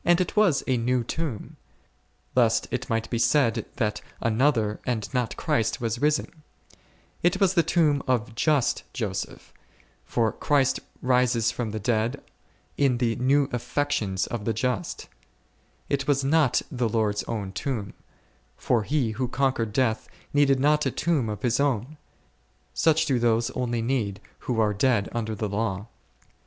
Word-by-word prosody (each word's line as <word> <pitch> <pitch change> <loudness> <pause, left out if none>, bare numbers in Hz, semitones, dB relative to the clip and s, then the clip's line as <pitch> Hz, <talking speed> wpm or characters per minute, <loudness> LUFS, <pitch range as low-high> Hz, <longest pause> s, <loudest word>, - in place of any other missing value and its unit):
It 175 +1 +2
was 205 -10 +3
a 130 -2 +1
new 125 +1 +1
tomb, 140 -3 -5 0.8
lest - - +3
it - - -3
might 115 0 0
be 120 - 0
said 115 -4 +2
that 105 -5 -1 0.2
another 115 -2 +1
and 110 -5 -2
not 125 -3 -1
Christ 115 -1 0
was 115 0 -2
risen; 150 +1 0 0.8
it 175 +2 +2
was 190 -2 +3
the 175 - +4
tomb 155 -3 +2
of 120 -3 0
just 145 +2 +1
Joseph, - - -4 0.5
for 115 -2 0
Christ 140 -3 +1 0.2
rises 125 -2 +2
from 120 -3 -3
the 110 +1 -4
dead 115 +4 0 0.6
in 135 -4 +3
the 120 -2 0
new 135 +3 +3
affections 115 -7 -1
of 115 -3 -5
the 115 - +1
just; 120 -1 -2 0.8
it 140 -1 -1
was 140 -2 +2
not 145 -2 +3
the 120 -3 0
Lord's 105 -2 0
own 105 -4 -4
tomb, 100 +1 -3 0.6
for 120 - +1
He 130 0 0
who 125 +4 -2
conquered 130 -4 0
death 110 -2 0 0.3
needed 140 -2 +4
not 150 +2 +3
a - - +2
tomb 150 -9 0
of 105 - -5
His 120 0 +1
own; 140 +1 0 0.8
such 160 0 +3
do 135 -5 +1
those 115 +1 +2
only 120 -3 -2
need, 115 -6 -1 0.3
who 120 -2 +1
are 105 -1 +3
dead 105 -1 +1
under 110 -2 -2
the 105 +1 -2
law. 100 -1 -2
125 Hz, 150 wpm, -26 LUFS, 110-140 Hz, 0.8 s, the